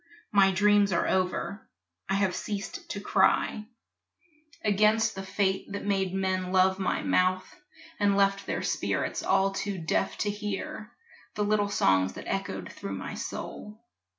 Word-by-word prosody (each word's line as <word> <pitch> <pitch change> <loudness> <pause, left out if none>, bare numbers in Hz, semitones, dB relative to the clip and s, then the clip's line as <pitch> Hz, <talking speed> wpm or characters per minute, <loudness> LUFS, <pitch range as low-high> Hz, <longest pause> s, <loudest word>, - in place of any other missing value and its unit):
My 195 -2 +5
dreams 205 +1 +4
are 170 - +1
over, 190 +2 -1 0.4
I 195 - +2
have 195 -2 +1
ceased 200 -2 -5
to 200 - -4
cry 210 +1 +2 1.0
Against 215 +2 +3
the 195 - -6
fate 195 0 -1
that 200 - -4
made 195 -2 0
men 185 -1 -1
love 190 0 +3
my 190 - -1
mouth 185 0 +2 0.5
And 200 -1 +3
left 195 0 +2
their - - -2
spirits - - -1
all 195 0 +2
too 195 0 -3
deaf 170 +3 -1
to 205 - 0
hear 210 +1 -5 0.4
The 210 - 0
little 205 0 +1
songs 95 - +2
that - - -9
echoed - - -3
through 100 0 -6
my 95 - -6
soul. 210 +1 -7
195 Hz, 150 wpm, -28 LUFS, 190-205 Hz, 1.0 s, My